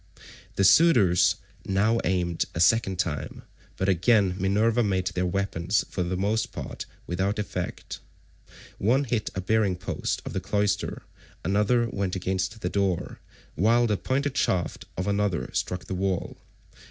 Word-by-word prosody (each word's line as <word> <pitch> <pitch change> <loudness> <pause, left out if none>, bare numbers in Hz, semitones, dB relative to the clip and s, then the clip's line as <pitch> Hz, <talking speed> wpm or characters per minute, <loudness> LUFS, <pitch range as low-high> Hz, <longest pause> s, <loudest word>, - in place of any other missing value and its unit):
The 100 - +2
suitors 100 - +5 0.3
now 105 +4 +2
aimed 90 -2 0
a - - -2
second 95 0 +3
time, 85 -5 -3 0.3
but 95 - -1
again 95 +1 +3
Minerva 105 +5 +2
made 95 -4 0
their 90 0 -1
weapons 95 0 0
for 90 - -2
the 90 +1 -1
most 105 +4 0
part - - -7 0.2
without 95 +4 -1
effect. 90 -4 -5 0.8
One 125 +8 +3
hit 120 -5 -1
a 95 - -2
bearing 100 -1 +1
post 90 - -3
of - - -5
the 95 - -1
cloister; 100 +1 -1 0.4
another 105 +5 +2
went 100 -4 -2
against 95 +3 -2
the - - -1
door; 100 -3 -1 0.3
while 115 +7 +3
the 105 -3 +1
pointed 140 +6 -1
shaft 90 -3 0
of 90 - -1
another 100 -3 0
struck 90 0 -2
the - - -5
wall. 95 -1 -2
100 Hz, 145 wpm, -26 LUFS, 90-110 Hz, 0.8 s, suitors